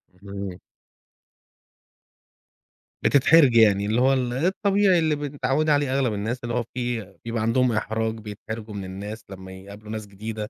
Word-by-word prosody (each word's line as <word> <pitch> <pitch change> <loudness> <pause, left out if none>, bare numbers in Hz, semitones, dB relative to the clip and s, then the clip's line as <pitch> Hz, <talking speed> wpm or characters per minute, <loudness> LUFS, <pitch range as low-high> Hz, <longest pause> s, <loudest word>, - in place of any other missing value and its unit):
اهم. 100 -1 -7 2.4
بتتحرجي 140 -4 +5
يعني، 100 -2 +4
اللي 110 +4 +1
هو 135 +1 +4
ال 125 -2 -1
الطبيعي 190 - +2
اللي 155 -2 +1
ب 145 - -8
متعوِّدة 150 +2 +1
عليه 145 -2 +1
أغلب 135 -5 +1
الناس، 110 +5 -3
اللي 120 0 -3
هو 120 - 0
في 120 -5 -3
بيبقى 115 -1 -2
عندهم 120 +3 +2
إحراج، 110 0 -1
بيتحرجوا 110 +1 -8
من 100 -1 -5
الناس 100 +4 -7
لمّا 95 -1 -10
يقابلوا 100 +3 -11
ناس 110 -1 -5
جديدة. 105 +2 -6
110 Hz, 150 wpm, -24 LUFS, 105-130 Hz, 2.4 s, بتتحرجي